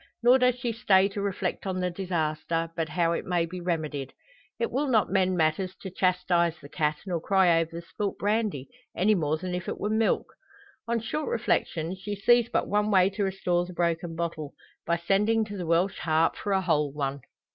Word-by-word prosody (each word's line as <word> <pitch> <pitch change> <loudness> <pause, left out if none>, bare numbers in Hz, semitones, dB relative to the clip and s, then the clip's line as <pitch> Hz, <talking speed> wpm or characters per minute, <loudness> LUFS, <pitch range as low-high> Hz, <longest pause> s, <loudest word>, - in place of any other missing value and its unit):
Nor 250 +2 +6
does 250 -1 +3
she 245 -1 -2
stay 195 -4 +4
to 200 0 -5
reflect 195 -1 -2
on 185 -1 -2
the 180 0 -1
disaster, 165 -2 -2
but 165 -1 -2
how 165 +2 +1
it 170 - -1
may 175 -2 0
be 180 +2 -7
remedied. 155 -6 -3 0.4
It 230 - -1
will 280 +4 0
not 225 -7 +2
mend 185 -2 +2
matters 170 +4 0
to 190 - -7
chastise 180 -2 +1
the 145 - -12
cat, 150 0 0
nor 175 -4 -2
cry 180 -3 +4
over 165 -1 -1
the 170 +1 -7
spilt 200 +3 -4
brandy, 205 - -1 0.3
any 205 +4 +4
more 155 -5 0
than 180 +2 -5
if 180 -1 -4
it - - -4
were 210 - -1
milk. 220 0 +1 0.5
On 235 0 +1
short 295 +7 -3
reflection 180 -6 -1
she 205 +2 -5
sees 240 +3 +4
but - - 0
one 210 +1 +1
way 190 -1 +4
to 205 +1 -2
restore 185 -2 0
the 180 - -9
broken 170 -1 -1
bottle 165 -3 -4 0.3
by 170 0 +2
sending 210 +6 +2
to 205 -1 -7
the 180 -4 -5
"Welsh 170 +4 +1
Harp" 160 0 +2
for 205 - -4
a 190 -1 +3
whole 150 -5 +1
one. 140 -1 -3
180 Hz, 205 wpm, -27 LUFS, 165-205 Hz, 0.5 s, Nor